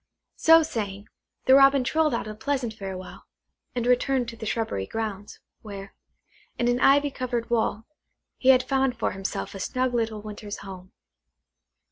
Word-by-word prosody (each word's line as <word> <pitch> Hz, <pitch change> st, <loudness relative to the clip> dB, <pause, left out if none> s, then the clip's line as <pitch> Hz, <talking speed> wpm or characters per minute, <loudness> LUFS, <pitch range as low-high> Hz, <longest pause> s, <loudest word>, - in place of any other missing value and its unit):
So 325 Hz, 0 st, +7 dB
saying, 205 Hz, -7 st, -5 dB, 0.4 s
the 260 Hz, -, +6 dB
Robin 275 Hz, 0 st, +6 dB
trilled 310 Hz, 0 st, +1 dB
out 225 Hz, -, -3 dB
a 215 Hz, -, -5 dB
pleasant 240 Hz, +1 st, -2 dB
farewell, 190 Hz, -3 st, -8 dB, 0.5 s
and 240 Hz, -1 st, -1 dB
returned 250 Hz, 0 st, +2 dB
to 230 Hz, -, -9 dB
the 220 Hz, -1 st, -7 dB
shrubbery 215 Hz, -, -2 dB
grounds, 210 Hz, -3 st, -5 dB, 0.2 s
where, 200 Hz, -2 st, -9 dB, 0.6 s
in 240 Hz, -, 0 dB
an 245 Hz, 0 st, +2 dB
ivy 285 Hz, +2 st, +4 dB
covered 245 Hz, -3 st, -3 dB
wall, 220 Hz, -1 st, 0 dB, 0.5 s
he 260 Hz, -, +3 dB
had 255 Hz, -1 st, +6 dB
found 265 Hz, -3 st, 0 dB
for 235 Hz, -, 0 dB
himself 195 Hz, +1 st, -4 dB
a 195 Hz, -, -7 dB
snug 255 Hz, +6 st, -1 dB
little 220 Hz, -3 st, -1 dB
winter's 210 Hz, -1 st, -7 dB
home. 185 Hz, -1 st, -10 dB
230 Hz, 155 wpm, -26 LUFS, 205-260 Hz, 0.6 s, So